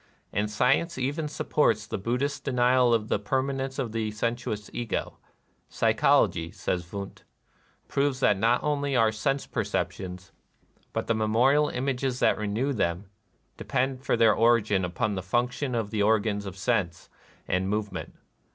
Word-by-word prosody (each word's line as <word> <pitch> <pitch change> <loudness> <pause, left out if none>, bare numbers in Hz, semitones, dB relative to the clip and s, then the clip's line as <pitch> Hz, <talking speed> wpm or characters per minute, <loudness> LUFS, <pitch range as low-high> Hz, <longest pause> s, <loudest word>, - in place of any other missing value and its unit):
And 105 +2 0
science 135 +10 +1
even 145 +4 -1
sup 150 - -6
ports 110 -7 +3
the 105 - -4
Buddhist 135 +7 -2
denial 125 -1 +3
of 110 -2 +1
the - - 0
permanence 135 +4 -2
of 125 -5 -2
the 110 -1 -2
sensuous 110 -1 -3
Ego. 120 -2 -3 0.5
"Psychology," 80 0 +2
says 85 +1 -3
Wundt, 100 -1 -7 0.6
"proves 140 -2 0
that 105 -6 +3
not 115 +3 +2
only 145 -2 0
our 115 -2 +4
sense 135 +5 -1
per - - -2
ceptions, 90 -2 -4 0.6
but - - -2
the 115 - +1
memorial 120 +7 +3
images 130 0 -1
that - - +3
renew 110 +7 -1
them, 95 -2 -2 0.5
depend 130 0 -1
for 125 - +1
their 115 -2 +5
origin 110 -4 +3
upon 90 +4 -1
the 95 - -3
func 120 +7 +1
tionings 130 0 -3
of 105 -2 -4
the 105 - 0
organs 105 -1 +1
of 95 0 -8
sense 95 -6 -1 0.4
and 95 +1 0
move 105 0 -1
ment. - - -7
115 Hz, 160 wpm, -27 LUFS, 105-130 Hz, 0.6 s, their